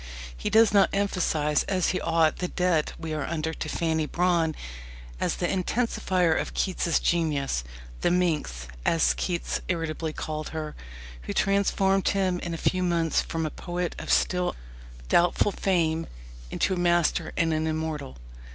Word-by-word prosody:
He - - -3
does 220 -1 +5
not 200 -1 +5
emphasize 165 -7 +1
as 185 -3 +1
he 185 - -1
ought 165 -1 +2
the 180 - -2
debt 180 -4 0
we 160 -1 -5
are 155 - -2
under 160 -1 -2
to - - -5
Fanny 160 -2 0
Brawne 170 -3 +1 0.6
as - - 0
the - - -2
intensifier 185 -3 +1
of - - -7
Keats's 175 -3 +1
genius 145 - 0 0.4
the - - +3
"minx," 160 - 0 0.2
as - - +3
Keats 60 +1 -2
irritably 160 -1 -2
called 155 0 -5
her, 155 -1 -5 0.5
who - - -2
transformed 195 -1 +2
him 185 -2 +1
in 170 -1 -4
a - - -5
few 185 +2 0
months 170 -3 +1
from 165 -1 -3
a 155 - -3
poet 175 +2 -4
of - - -4
still 180 -1 +2 0.5
doubtful 175 - +3
fame 165 -5 0 0.4
into 190 - 0
a - - -2
master 175 -1 +2
and 165 -2 +2
an 155 0 0
immortal. 155 - -3
165 Hz, 155 wpm, -26 LUFS, 155-180 Hz, 0.6 s, does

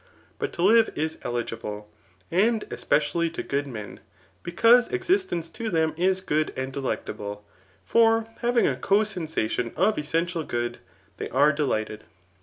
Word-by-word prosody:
But - - -2
to 170 - -2
live 225 +3 +6
is 160 +1 -2
eligible, 115 -3 -4 0.4
and 215 +5 +2
especially 155 +3 +1
to 165 - -5
good 140 +1 -2
men, 105 -7 -8 0.4
because 230 +8 +5
existence 375 - 0
to 225 +6 -5
them 160 -3 +1
is 185 +3 +1
good 155 -4 0
and 130 0 -3
delectable; 105 -6 -4 0.4
for, 225 -1 +4
having 240 0 +2
a - - +1
co 200 +2 +2
sensadon 160 - -2
of 200 +4 +2
essential 165 +3 -1
good, 120 -3 -3 0.4
they - - -5
are 145 +3 +4
delighted. 110 -7 -2
160 Hz, 140 wpm, -25 LUFS, 130-210 Hz, 0.4 s, live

